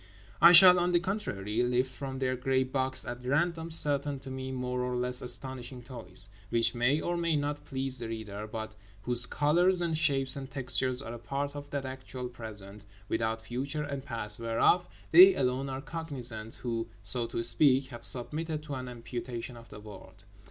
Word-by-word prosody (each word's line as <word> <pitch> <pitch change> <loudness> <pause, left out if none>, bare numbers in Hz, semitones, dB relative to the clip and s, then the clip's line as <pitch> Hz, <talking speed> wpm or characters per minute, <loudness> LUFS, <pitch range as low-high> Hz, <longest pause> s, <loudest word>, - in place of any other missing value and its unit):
I 170 - +10
shall 180 +1 +9
(on 175 0 +1
the 175 - +5
contrary) 120 - -2
lift 125 +1 +1
from 135 0 -6
their 130 -1 0
grey 130 +1 +1
box 130 0 -1
at 120 0 -6
random 165 +5 0
certain 145 -3 +2
(to 135 - -9
me) 130 0 -5
more 125 -1 -3
or 125 0 -2
less 125 0 0
astonishing 125 0 -3
toys; 115 -8 -6 0.2
which 115 -2 +2
may 125 +5 +2
or 175 - -2
may 170 -2 0
not 145 0 -2
please 130 -2 0
the 115 - -4
reader, 110 -2 -6
but 110 -1 -5 0.3
whose 120 +1 +3
colours 175 +5 +2
and 170 -2 0
shapes 135 -4 +1
and 135 -1 -7
textures 130 -1 0
are 115 - -7
a 120 - -8
part 140 +5 -4
of 145 0 -8
that 140 -2 -3
actual 130 -1 -6
Present—without 105 0 -5
future 135 +6 -3
and 140 -2 -5
past—whereof 115 +7 +1 0.2
they 185 +3 +9
alone 130 +1 0
are 135 0 -4
cognizant 130 -8 -4
who—so 115 -1 -2
to 115 0 -3
speak—have 130 0 +2
submitted 150 +7 +1
to 150 -2 -7
an 130 -1 -5
amputation 120 0 -6
of 115 0 -14
the - - -10
world. 105 0 -13
130 Hz, 175 wpm, -30 LUFS, 115-145 Hz, 0.3 s, I